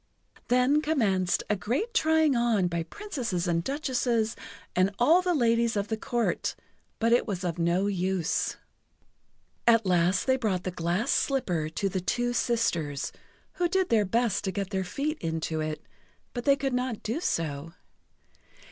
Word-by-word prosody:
Then 250 +4 +3
commenced 205 - +1
a 210 - +1
great 250 - -2
trying 315 -3 +3
on 235 -5 +2
by 170 -1 -2
Princesses 230 - -4
and 170 -1 +1
Duchesses 245 - 0 0.4
and 185 +1 +4
all 320 +9 +5
the 360 -1 +1
ladies 235 -3 +2
of 200 0 -2
the 220 - 0 0.2
Court 240 -2 0 0.4
but 230 +1 +2
it 240 - +3
was 190 -4 -3
of 175 -1 -2
no 170 +3 +2
use. 190 -3 -1 1.1
At 230 -2 +5
last 180 +1 +2
they 260 0 +3
brought 200 -7 -1
the 185 - -3
glass 175 +5 -1
slipper 180 - 0
to 195 +5 -2
the 190 -1 -2
two 245 +6 0
sisters, 170 - 0 0.5
who 350 -1 +1
did 380 0 +1
their 220 -3 +3
best 230 +3 +1
to 190 - 0
get 195 +1 -4
their 190 -1 0
feet 290 - -3
into 160 -1 -2
it, 155 0 -4 0.5
but 240 -1 -5
they 280 - +6
could 270 -1 -2
not 250 -3 -2
do 230 +8 -2
so. 165 - -2
220 Hz, 160 wpm, -28 LUFS, 180-250 Hz, 1.1 s, they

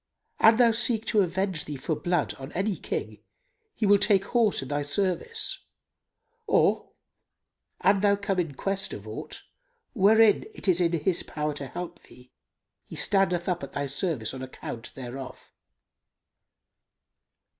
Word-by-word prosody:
An 220 0 +6
thou 235 -2 +6
seek 225 -1 +1
to 215 -3 +3
avenge 185 -2 -1
thee 150 - -5
for 145 +4 -2
blood 175 -1 0
on 135 +2 -8
any 195 +2 0
King, - - -5 0.5
he 220 - -1
will 200 0 +5
take 200 -1 +3
horse 225 - +2
in 135 - -9
thy 145 0 -1
service; 200 - 0 0.9
or, 430 - +2 0.9
an 195 +1 +4
thou 200 -1 +4
come 200 -2 -2
in 160 -6 -2
quest 195 +6 -2
of 105 +1 -8
aught, 150 +8 -7 0.5
wherein 220 - +5
it - - -7
is 180 -1 +3
in 170 -1 +2
his 170 +2 0
power 150 0 -3
to 145 -1 -6
help 175 +6 -7
thee, 125 0 -17 0.5
he - - -11
standeth 180 -3 +2
up 180 -2 -1
at 140 - -8
thy 145 - -2
service 140 - -2
on 130 - -7
account 125 -3 -7
thereof." 130 0 -8
180 Hz, 150 wpm, -27 LUFS, 145-200 Hz, 0.9 s, An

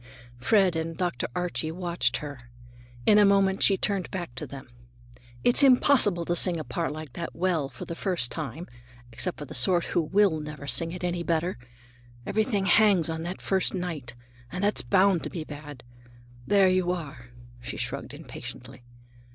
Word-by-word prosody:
Fred 190 - +3
and 160 0 -3
Dr. 175 -9 -2
Archie 175 -3 -2
watched 170 -8 -1
her. 140 -5 -9 0.6
In 210 -1 +6
a - - +7
moment 195 -1 +3
she 195 - +4
turned 195 -1 -1
back 175 -9 -5
to 125 - -6
them. 135 -2 -10 0.8
"It's 245 - +6
impossible 250 -9 +5
to 175 - 0
sing 175 -1 +5
a - - -4
part 170 +1 -3
like 155 -4 -8
that 170 +3 -6
well 165 -5 0
for - - -9
the - - -5
first 170 -8 0
time, 155 +2 -5 0.5
except 180 +9 -3
for 145 - -7
the - - -10
sort 170 +7 +3
who 175 - 0
will 190 0 +2
never 150 -1 -8
sing 140 +5 +1
it 180 +1 -7
any 175 -1 -1
better. 170 +1 -1 0.7
Everything 215 -2 0
hangs 195 -5 +4
on 160 0 -3
that 175 +3 -6
first 190 0 0
night, 155 -10 -5 0.4
and 185 +2 -4
that's 205 +1 +2
bound 190 -3 +3
to - - -5
be 165 - -5
bad. 145 -3 -10 0.6
There 200 -2 +5
you 185 -1 +2
are," 140 -9 -7 0.3
she 120 - -6
shrugged - - -4
impatiently. - - -10
175 Hz, 175 wpm, -26 LUFS, 150-190 Hz, 0.8 s, a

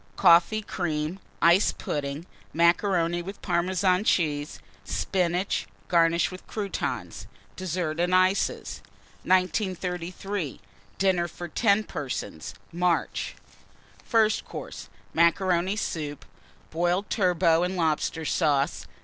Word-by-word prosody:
Coffee 175 +6 +5
Cream. 160 -2 -3 0.2
Ice 170 +4 +5
Pudding. 145 +2 -4 0.3
Macaroni 170 0 +2
with 195 +3 -8
Parmesan 185 +1 +1
Cheese. 150 -7 0 0.3
Spinach, 180 0 -1 0.2
garnished 170 0 +3
with 185 - -11
Croutons. 205 -3 -4 0.3
DESSERT 175 -3 -3
AND 180 +1 +2
ICES. 185 +2 +1 0.4
1933. 185 - -1 0.4
DINNER 185 -3 +2
FOR 175 +1 -8
10 200 +5 +2
PERSONS 110 - -5 0.2
(March). 175 0 0 0.7
FIRST 220 -2 +2
COURSE. 100 - -8 0.2
Macaroni 175 +2 +2
Soup. 150 -8 -4 0.5
Boiled 175 +4 0
Turbot 175 -4 +3
and 180 +1 -2
Lobster 160 0 0
Sauce. 145 -4 +1
175 Hz, 95 wpm, -26 LUFS, 165-185 Hz, 0.7 s, Coffee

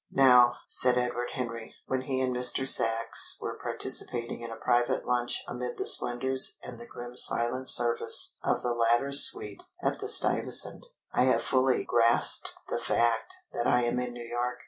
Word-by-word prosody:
"Now," 125 -2 +4
said 125 -1 +4
Edward 120 0 -3
Henry, 115 -3 -7
when 130 -1 -3
he 130 0 -4
and 130 -1 -2
Mr. 125 +2 +1
Sachs 115 -2 +4
were - - -7
participating 120 -1 -1
in 115 - -8
a 115 - -8
private 120 +1 -1
lunch 120 -1 -2
amid 125 0 -7
the - - -4
splendours 130 +2 +1
and 120 -2 -11
the 120 - -12
grim 120 0 -11
silent 125 +1 0
service 120 -1 +2
of - - -2
the 120 - -2
latter's 120 +4 +3
suite 105 -1 -2 0.2
at - - -2
the - - -6
Stuyvesant, - - 0 0.3
"I 125 - +2
have 130 - +1
fully 130 0 0
grasped 115 0 +2
the - - -4
fact 120 - -1 0.2
that 120 - -3
I 125 0 +1
am 120 +1 -2
in 125 0 -5
New 120 -1 -10
York. 120 +1 -4
120 Hz, 170 wpm, -27 LUFS, 120-125 Hz, 0.3 s, Now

